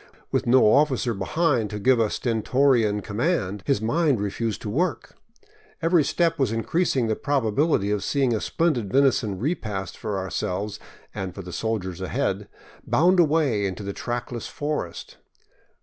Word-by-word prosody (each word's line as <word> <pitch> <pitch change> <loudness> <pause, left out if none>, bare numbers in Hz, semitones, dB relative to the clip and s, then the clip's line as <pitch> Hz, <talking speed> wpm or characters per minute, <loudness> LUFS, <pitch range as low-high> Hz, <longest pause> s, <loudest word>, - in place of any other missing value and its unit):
With - - 0
no 130 +2 +5
officer 130 0 +3
behind 115 - 0
to 105 - -5
give 125 +4 +3
a 110 -2 +2
stentorian 115 -2 +1
com 105 -1 -7
mand, 105 - 0
his 135 -7 +2
mind 145 +1 +2
refused 105 +2 -2
to 105 - -4
work. 175 - -1 0.7
Every 165 -1 +3
step 165 +3 +1
was 130 -5 +2
increasing 125 - 0
the 110 -1 0
probability 135 -4 +1
of 105 -2 -1
seeing 135 -1 +1
a 110 - -1
splendid 130 - 0
venison 125 -7 +2
repast 105 - -3
for 105 -2 -4
ourselves 95 +2 -3 0.3
and 95 -4 -5
for 95 - -7
the 90 0 -9
soldiers 95 -5 -3
ahead 95 - -2 0.4
bound 180 +4 +3
away 145 -11 +2
into 95 +2 -5
the 100 0 -4
trackless 120 0 -4
forest. 145 - -4
115 Hz, 150 wpm, -24 LUFS, 105-145 Hz, 0.7 s, no